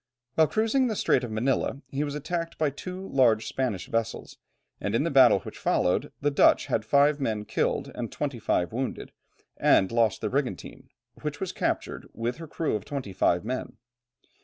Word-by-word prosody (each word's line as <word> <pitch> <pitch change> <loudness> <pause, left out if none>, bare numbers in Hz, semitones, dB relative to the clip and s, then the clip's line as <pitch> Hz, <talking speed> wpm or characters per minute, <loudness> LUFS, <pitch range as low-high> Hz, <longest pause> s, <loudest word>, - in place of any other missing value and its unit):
While 160 +2 +4
cruising 220 - +1
in 255 - +3
the 220 - -1
Strait 130 - +2
of 120 - -4
Manilla 130 +5 -1
he 140 +2 -1
was 145 -1 -4
attacked 165 +3 -3
by 155 -3 +1
two 185 +6 -7
large 115 -5 +3
Spanish 120 -9 -2
vessels, 115 0 -3 0.4
and - - -2
in - - +2
the - - -1
battle - - +6
which - - -10
followed 90 - +1
the 145 +1 +2
Dutch 140 - +4
had 120 -5 0
five 140 +5 +3
men 110 -6 -2
killed, - - -1
and 120 -2 -5
twenty 140 -5 -3
five 90 -3 0
wounded 130 +2 -4 0.5
and 95 - +4
lost 115 -3 +2
their - - -2
brigantine, - - -3 0.3
which - - -4
was - - -3
captured - - -2
with 120 +3 -3
her 165 -1 -8
crew 155 +1 -2
of 105 - -3
twenty 130 -9 -5
five 90 +1 +2
men. 130 +2 -4
135 Hz, 185 wpm, -27 LUFS, 115-150 Hz, 0.5 s, battle